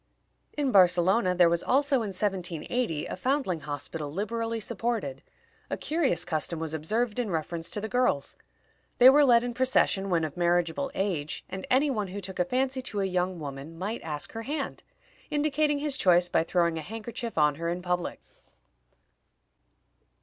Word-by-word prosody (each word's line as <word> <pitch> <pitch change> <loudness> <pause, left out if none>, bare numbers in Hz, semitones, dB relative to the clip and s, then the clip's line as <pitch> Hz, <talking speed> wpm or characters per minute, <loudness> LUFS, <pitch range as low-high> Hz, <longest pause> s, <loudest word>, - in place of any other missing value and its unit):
In 285 -3 +1
Barcelona 185 +1 +4
there 175 -1 +6
was 170 0 +2
also, 280 +1 +2
in 225 -3 -1
1780, 185 -1 -2
a - - -5
foundling 250 - 0
hospital 145 +1 -5
liberally 225 +5 -2
supported. 215 - -2 0.5
A - - -2
curious 300 - 0
custom 160 +1 -1
was 160 -1 -4
observed 215 +9 -1
in 235 -4 -1
reference 165 0 -3
to - - -3
the 220 - -4
girls. 245 - 0 0.6
They 255 +2 +9
were 295 +2 +6
led 240 -3 +5
in 245 0 -3
procession 235 -6 +2
when 170 -3 +2
of 155 -2 -4
marriageable 175 +7 +1
age, 175 -7 -2
and 190 0 -6
any 275 +3 +3
one 210 -5 -2
who 190 +2 -6
took 190 -1 -7
a 180 - +3
fancy 260 +5 0
to 210 -5 -3
a - - +1
young 180 -1 -1
woman 145 +2 -7
might 205 +6 -4
ask 150 -2 -5
her 225 - -5
hand, 280 +4 -4 0.5
indicating 295 0 +1
his 290 -1 -2
choice 175 -1 +4
by 165 - +2
throwing 170 -2 +1
a - - -5
handkerchief 225 +4 -6
on 150 -1 +4
her 170 - -1
in 175 +1 -3
public. 180 -1 -2
190 Hz, 170 wpm, -28 LUFS, 170-245 Hz, 0.6 s, They